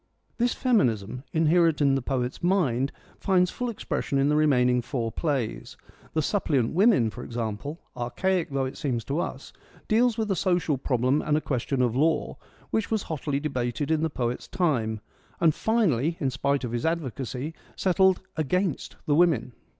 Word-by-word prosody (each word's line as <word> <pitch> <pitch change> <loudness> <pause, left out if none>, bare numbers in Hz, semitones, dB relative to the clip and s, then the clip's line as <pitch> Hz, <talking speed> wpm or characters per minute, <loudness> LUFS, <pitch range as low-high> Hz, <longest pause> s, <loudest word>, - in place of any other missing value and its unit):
This 240 +1 +2
feminism, 125 - +1
inherent 165 0 +3
in 140 -2 +4
the 135 - +1
poet's 125 -1 -2
mind, 145 -8 +1 0.3
finds 180 -2 +2
full 250 -1 -3
expression 210 -9 -2
in 135 +1 +3
the 150 - +3
remaining 125 -5 +3
four 120 -2 -3
plays. 135 -4 -2 0.4
The 155 - +1
Suppliant 140 - +1
Women, 185 - +4
for 120 - -8
example, 120 +6 -4 0.2
archaic 170 +9 -1
though 135 -1 -1
it 130 - -6
seems 125 -5 -1
to 140 +4 -2
us, - - -5 0.3
deals 235 +1 +3
with 220 -2 -1
a - - +2
social 175 -5 +1
problem 130 +2 +1
and 150 0 +1
a - - +2
ques 130 -5 -2
tion 135 -2 +1
of 120 -1 0
law, 155 +4 +1 0.3
which 220 -2 0
was 220 -3 0
hotly 145 -3 -2
debated 140 0 -2
in 155 -1 +2
the 160 - +1
poet's 125 -4 -3
time, 115 - 0 0.4
and 165 -2 +4
finally, 170 - +1
in 135 -6 0
spite 140 +1 0
of 120 - -3
his 120 0 -2
advocacy, 145 -3 -3 0.2
settled 190 0 +3
against 165 +1 -1
the 150 - +2
women. 150 -7 +3
145 Hz, 170 wpm, -26 LUFS, 125-175 Hz, 0.4 s, in